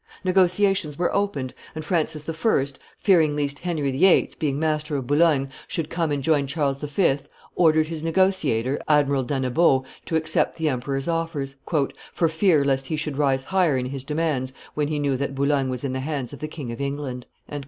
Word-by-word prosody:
Negotiations 185 Hz, -3 st, +2 dB
were 175 Hz, -, 0 dB
opened; 150 Hz, -11 st, -1 dB, 0.2 s
and 155 Hz, -1 st, -5 dB
Francis 155 Hz, -3 st, -1 dB
I., 160 Hz, -2 st, +1 dB, 0.3 s
fearing 165 Hz, -7 st, +3 dB
least 145 Hz, -1 st, -2 dB
Henry 155 Hz, -6 st, -1 dB
VIII., 175 Hz, +8 st, +4 dB
being 145 Hz, -4 st, 0 dB
master 155 Hz, -1 st, -1 dB
of 135 Hz, -, -4 dB
Boulogne, 145 Hz, -1 st, +3 dB, 0.2 s
should 160 Hz, -2 st, -3 dB
come 165 Hz, -3 st, 0 dB
and 140 Hz, -2 st, -1 dB
join 145 Hz, -2 st, +2 dB
Charles 140 Hz, -2 st, -1 dB
V., 150 Hz, 0 st, +1 dB, 0.3 s
ordered 160 Hz, -2 st, +4 dB
his 160 Hz, -1 st, -5 dB
negotiator, 160 Hz, -8 st, +1 dB
Admiral 140 Hz, -2 st, +3 dB
d'Annebaut, 130 Hz, +2 st, +2 dB, 0.2 s
to 160 Hz, -, -1 dB
accept 160 Hz, 0 st, +1 dB
the 160 Hz, -2 st, 0 dB
emperor's 135 Hz, +2 st, -2 dB
offers, 165 Hz, -5 st, -2 dB, 0.6 s
"for 165 Hz, -, +3 dB
fear 160 Hz, -3 st, +3 dB
lest 135 Hz, -1 st, 0 dB
he 155 Hz, -, -1 dB
should 150 Hz, -2 st, -3 dB
rise 135 Hz, -2 st, +2 dB
higher 175 Hz, -3 st, +2 dB
in 125 Hz, -, -1 dB
his 135 Hz, 0 st, -5 dB
demands 150 Hz, -3 st, -1 dB, 0.2 s
when 150 Hz, -1 st, 0 dB
he 150 Hz, 0 st, -2 dB
knew 140 Hz, -2 st, +1 dB
that 140 Hz, 0 st, -3 dB
Boulogne 140 Hz, -1 st, +1 dB
was 125 Hz, 0 st, -4 dB
in 135 Hz, -2 st, -2 dB
the 130 Hz, -, -2 dB
hands 140 Hz, -2 st, -4 dB
of 140 Hz, -, -9 dB
the 155 Hz, -, -4 dB
King 145 Hz, -6 st, -6 dB
of 115 Hz, -, -6 dB
England." 140 Hz, -3 st, -4 dB
150 Hz, 185 wpm, -24 LUFS, 135-165 Hz, 0.6 s, VIII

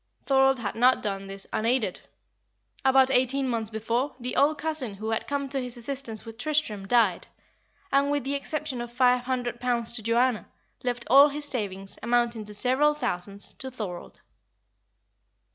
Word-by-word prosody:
Thorold 270 Hz, -1 st, +4 dB
had 230 Hz, -4 st, -3 dB
not 250 Hz, +2 st, +3 dB
done 195 Hz, -2 st, -3 dB
this 195 Hz, 0 st, -7 dB
unaided. 225 Hz, -4 st, 0 dB, 0.8 s
About 265 Hz, 0 st, +5 dB
eighteen 265 Hz, +1 st, +2 dB
months 230 Hz, -3 st, -1 dB
before, 230 Hz, +5 st, -2 dB
the 250 Hz, +1 st, -4 dB
old 300 Hz, +2 st, +3 dB
cousin 300 Hz, -9 st, -2 dB
who 215 Hz, +3 st, -4 dB
had 225 Hz, -, -1 dB
come 280 Hz, -1 st, -2 dB
to 270 Hz, 0 st, 0 dB
his 250 Hz, -1 st, -6 dB
assistance 240 Hz, -3 st, -4 dB
with 225 Hz, +1 st, -10 dB
Tristram, 245 Hz, -9 st, -1 dB
died, 215 Hz, -6 st, +2 dB, 0.6 s
and, 280 Hz, +1 st, +3 dB
with 290 Hz, -2 st, 0 dB
the 275 Hz, +2 st, -2 dB
exception 280 Hz, -2 st, -3 dB
of 240 Hz, 0 st, -6 dB
five 250 Hz, 0 st, +3 dB
hundred 245 Hz, -2 st, -2 dB
pounds 240 Hz, -2 st, 0 dB
to 240 Hz, -, -2 dB
Joanna, 235 Hz, +1 st, +1 dB, 0.4 s
left 245 Hz, -1 st, -2 dB
all 275 Hz, +5 st, +8 dB
his 295 Hz, +1 st, -4 dB
savings, 195 Hz, -8 st, -3 dB
amounting 235 Hz, -2 st, 0 dB
to 210 Hz, -, -9 dB
several 260 Hz, +7 st, +3 dB
thousands, 200 Hz, -7 st, -3 dB
to 265 Hz, -, -6 dB
Thorold. 210 Hz, -9 st, -7 dB
245 Hz, 160 wpm, -27 LUFS, 220-270 Hz, 0.8 s, all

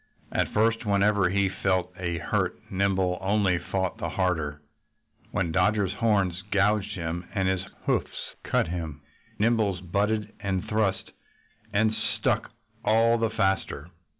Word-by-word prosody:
At -, -, 0 dB
first, 115 Hz, +2 st, +2 dB
whenever 100 Hz, -2 st, +3 dB
he 100 Hz, +1 st, +2 dB
felt 95 Hz, -1 st, 0 dB
a 90 Hz, -2 st, -2 dB
hurt -, -, -1 dB
Nimble 95 Hz, -2 st, +1 dB
only 95 Hz, -2 st, +2 dB
fought 95 Hz, -2 st, -2 dB
the -, -, -2 dB
harder. 80 Hz, -6 st, -1 dB, 0.7 s
When 85 Hz, -3 st, -1 dB
Dodger's 95 Hz, +2 st, +2 dB
horns 100 Hz, -5 st, +1 dB
gouged 105 Hz, +1 st, +2 dB
him 85 Hz, 0 st, -4 dB
and 95 Hz, -2 st, +1 dB
his 95 Hz, -1 st, +1 dB, 0.2 s
hoofs -, -, -1 dB
cut -, -, +1 dB
him 80 Hz, -4 st, -4 dB, 0.4 s
Nimble 105 Hz, -4 st, +2 dB
butted 105 Hz, +4 st, 0 dB
and 95 Hz, -3 st, -2 dB
thrust 105 Hz, -3 st, 0 dB, 0.6 s
and 110 Hz, +1 st, +2 dB
struck 110 Hz, +1 st, -1 dB, 0.3 s
all 115 Hz, +1 st, +4 dB
the 115 Hz, -1 st, +2 dB
faster. 95 Hz, -5 st, -1 dB
95 Hz, 130 wpm, -27 LUFS, 90-105 Hz, 0.7 s, all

